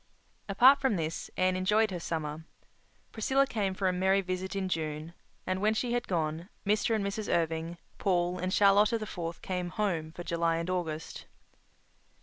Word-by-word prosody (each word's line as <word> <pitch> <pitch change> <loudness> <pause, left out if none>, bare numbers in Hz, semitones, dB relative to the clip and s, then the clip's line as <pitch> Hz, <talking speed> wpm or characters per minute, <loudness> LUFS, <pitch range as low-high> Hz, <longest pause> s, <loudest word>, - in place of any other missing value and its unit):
Apart 255 +8 +6
from 265 -6 +2
this, 160 -2 -3
Anne 185 0 +2
enjoyed 210 +3 +2
her 180 - -3
summer. 160 -1 -4 0.7
Priscilla 265 +5 +2
came 205 -7 -2
for 190 0 0
a 185 - +2
merry 190 +2 +2
visit 185 +1 -4
in 195 -1 -1
June; 155 -1 -3 0.3
and, 185 0 -1
when 215 +1 +2
she 240 +1 -1
had 240 0 -1
gone, 165 0 -2 0.2
Mr. 210 +2 +2
and 205 -2 -1
Mrs. 205 +2 -3
Irving, 165 0 -1 0.2
Paul 180 -2 +1
and 185 +1 -2
Charlotta 205 +3 +5
the 215 - -5
Fourth 170 -4 -6
came 180 -1 -2
"home" 175 -6 -1
for 175 - -8
July 170 -1 0
and 165 +2 -2
August. 160 -3 -4
185 Hz, 170 wpm, -30 LUFS, 165-205 Hz, 0.7 s, Apart